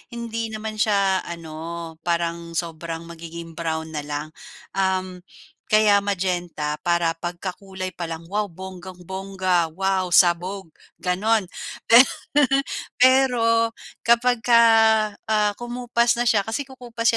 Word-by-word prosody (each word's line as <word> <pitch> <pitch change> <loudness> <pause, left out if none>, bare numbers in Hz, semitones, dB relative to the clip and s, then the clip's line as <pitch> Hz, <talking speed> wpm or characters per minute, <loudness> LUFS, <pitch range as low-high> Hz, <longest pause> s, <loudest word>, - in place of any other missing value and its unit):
hindi 230 -1 -3
naman 215 0 -6
sya 200 -3 +2
ano, 165 0 -7
parang 170 0 -2
sobrang 165 0 -4
magiging 170 0 -9
brown 160 -1 -4
nalang. 150 0 -4 0.4
Um, 185 -1 -1 0.5
kaya 215 -1 +5
magenta 175 -6 -2
para 170 -1 +1
pagkakulay 185 +2 -5
pa 175 -1 -6
lang, 165 0 -6
"Wow 210 +2 0
bonggang-bongga, 185 -1 -3
wow 190 -1 0
sabog!" 180 +1 +3 0.3
gano'n. 190 +2 +1 0.4
Per 235 +3 +9 1.0
pero 235 -3 +4 0.3
kapagka, 235 0 +4 0.6
ah, 210 -1 +1
kumupas 240 0 0
na - - +3
sya, 200 -3 +2
kasi 225 +5 -2
kukupas 240 -3 -2
190 Hz, 105 wpm, -23 LUFS, 170-220 Hz, 1.0 s, Per